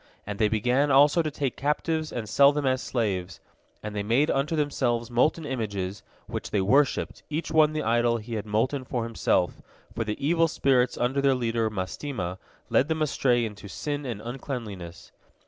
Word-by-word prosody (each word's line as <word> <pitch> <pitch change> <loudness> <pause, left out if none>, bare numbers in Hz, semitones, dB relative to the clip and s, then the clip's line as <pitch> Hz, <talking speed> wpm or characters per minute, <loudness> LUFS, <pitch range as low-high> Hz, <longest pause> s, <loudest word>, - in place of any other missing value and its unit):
And 105 0 -5
they 110 - +4
began 125 +7 +1
also 145 +4 +5
to 155 - -1
take 140 -3 -3
captives 155 +2 -1
and 115 -3 -4
sell 140 +6 +6
them 145 -1 -2
as 130 0 +1
slaves. 95 -7 -2 0.4
And 105 0 -5
they 105 - -1
made 120 +8 +2
unto 140 +4 0
themselves 125 -6 0
molten 150 +6 +2
images, 105 -8 -3 0.2
which - - -5
they 105 - 0
worshipped, 135 +9 +2
each 160 +2 -3
one 155 -1 +4
the 155 -1 -2
idol 120 +1 +2
he 115 +1 -8
had 110 -1 -3
molten 130 +6 0
for 120 -2 -3
himself, 110 -5 0 0.3
for 115 - -2
the 105 -1 -3
evil 165 +3 +3
spirits 130 -5 +2
under 130 +3 +1
their 135 -1 +3
leader 115 -2 0
Mastema 95 -1 -4 0.3
led 135 - +4
them 160 -1 0
astray 125 -5 +2
into 105 -2 -8
sin 145 +8 -4
and 115 -4 -4
uncleanness. 115 -9 -6
125 Hz, 180 wpm, -26 LUFS, 110-145 Hz, 0.4 s, sell